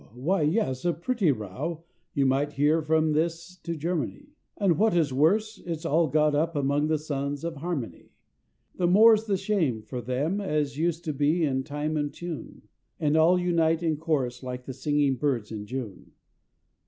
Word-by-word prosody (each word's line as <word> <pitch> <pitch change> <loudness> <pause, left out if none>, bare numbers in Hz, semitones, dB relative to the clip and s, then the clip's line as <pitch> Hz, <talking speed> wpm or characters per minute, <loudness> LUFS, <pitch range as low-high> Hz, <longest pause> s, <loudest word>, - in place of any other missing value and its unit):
why 165 +10 0
yes, 150 - 0
a 175 -1 +2
pretty 190 0 +1
row, 135 - -5 0.3
you 140 -2 +2
might 140 +2 +1
hear 150 +3 +2
from 155 0 +2
this 170 +3 -2
to 170 -2 -5
Garmany, 175 - -3 0.3
And 190 -5 +2
what 220 -2 +3
is 155 -6 +2
worse, 205 +10 +2
it's 165 -1 -5
all 165 +1 +3
got 150 +1 +2
up 160 +3 0
among 145 +1 +1
the 155 0 +1
Sons 145 -1 -4
of 165 -2 -4
Harmony, 140 - -5 0.6
The 175 - 0
more's 215 +4 +6
the 200 -3 0
shame 180 - 0
for 125 +3 -6
them 140 - -1
as 150 -7 -1
used 165 +2 -1
to 155 - -1
be 150 +5 +1
in 130 -3 0
time 150 +3 -3
and 145 -1 -1
tune, 170 0 -8 0.4
And 150 -1 +1
all 165 +3 +5
unite 165 -2 +1
in 160 -2 +1
chorus 140 -6 -1
like 125 -1 -6
the 130 - -6
singing 140 0 +1
birds 120 -6 -1
in 105 -2 -6
June! 120 -7 -6
155 Hz, 180 wpm, -27 LUFS, 140-170 Hz, 0.6 s, more's